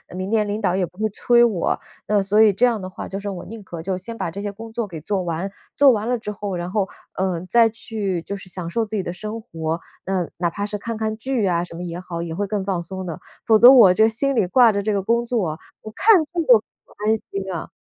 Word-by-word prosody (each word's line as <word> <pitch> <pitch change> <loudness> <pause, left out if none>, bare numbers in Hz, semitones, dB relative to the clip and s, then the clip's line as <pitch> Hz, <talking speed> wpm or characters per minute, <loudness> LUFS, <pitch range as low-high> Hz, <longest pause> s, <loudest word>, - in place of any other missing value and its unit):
明 185 +1 -4
天 215 -1 +2
领 210 +2 -3
导 185 -2 +1
也 190 -1 +1
不 180 - -18
会 215 0 +1
催 240 +3 +3
我。 210 -8 +1 0.3
嗯， 210 -1 +2
所 200 +2 +2
以 215 -2 +6
这 245 +6 +4
样 235 -3 0
的 185 - -6
话 185 - -7
就 195 - -5
是 200 0 -5
我 185 -3 -6
宁 220 0 -9
可 170 -3 -7
就 185 +2 -2
先 225 +5 -8
把 190 -5 -3
这 200 +5 -6
些 205 - -3
工 225 +3 -10
作 225 -2 -3
给 165 -4 -8
做 190 +3 -1
完， 175 +3 -3 0.2
做 280 -1 +7
完 220 -2 -1
了 245 0 +1
之 210 -1 -5
后， 200 -2 -4
然 175 0 -4
后， 195 0 0 0.3
嗯， 185 -2 -2
再 230 +3 +5
去 210 -5 -4
就 200 - -5
是 195 -1 -10
享 180 -2 -4
受 225 +6 0
自 215 - -6
己 205 - 0
的 175 - -4
生 215 +5 -6
活。 165 -6 -4 0.3
嗯， 185 -3 -2
哪 170 -1 0
怕 205 +4 -3
是 210 0 -4
看 230 +3 -5
看 220 0 -2
剧 245 -1 -1
呀 175 -3 +1
什 175 - -10
么 175 - -7
也 175 0 -5
好， 170 -2 -6
也 165 -1 -4
会 205 +3 -1
更 200 0 -2
放 190 -3 -1
松 190 +2 -6
的， 165 - -5 0.3
否 225 -2 +6
则 240 +4 +10
我 230 -8 +8
这 220 +3 +5
心 270 +5 0
里 220 - +3
挂 235 +4 +5
着 200 -1 -2
这 215 0 0
个 200 - 0
工 235 +4 +1
作， 190 -10 -1 0.2
我 215 - -9
看 430 0 +6
剧 - - -48 0.2
都 240 -4 +8
不 - - -25
安 220 +1 +4
心 195 -2 -6
啊。 165 - -5
200 Hz, 295 characters per minute, -22 LUFS, 180-220 Hz, 0.3 s, 则